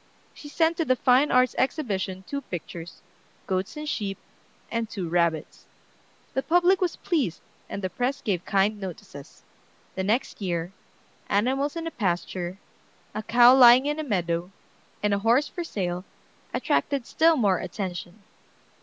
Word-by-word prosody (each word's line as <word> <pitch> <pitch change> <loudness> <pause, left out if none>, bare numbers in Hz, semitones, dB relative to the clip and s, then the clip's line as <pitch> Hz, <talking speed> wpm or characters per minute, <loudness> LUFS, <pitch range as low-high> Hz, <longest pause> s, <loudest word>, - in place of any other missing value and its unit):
She 290 - -11
sent 330 +2 +1
to 330 - +1
the 255 - +3
Fine 255 +3 +4
Arts 255 -1 +4
Exhibition 195 - -1
two 280 +6 -4
pictures, 175 - -8 0.4
"Goats 190 +8 -2
and 300 0 -5
Sheep" 200 -8 -2 0.5
and 230 -2 -2
"Two 190 -6 -4
Rabbits." 170 -2 -1 0.7
The 265 - 0
public 355 +5 +3
was 360 -2 0
pleased, 270 - -1 0.3
and 200 - -5
the 185 - -1
press 255 +3 -1
gave 185 -8 -2
kind 200 +2 +1
notices. 160 -6 -9 0.5
The 190 - -3
next 220 +3 -1
year 175 -2 -2 0.6
"Animals 265 +9 +1
in 330 0 -4
a 330 - -3
Pasture," 180 - -2 0.6
a 215 - -3
"Cow 240 +3 +6
lying 250 0 +8
in 295 +1 -1
a - - -2
Meadow," 175 - -1 0.5
and 210 -1 +2
a 200 - +1
"Horse 235 +7 +3
for 350 - -5
sale," 180 - -3 0.5
attracted 275 -4 0
still 325 +3 +3
more 200 -7 +2
attention. 185 0 -6
215 Hz, 150 wpm, -26 LUFS, 185-275 Hz, 0.7 s, lying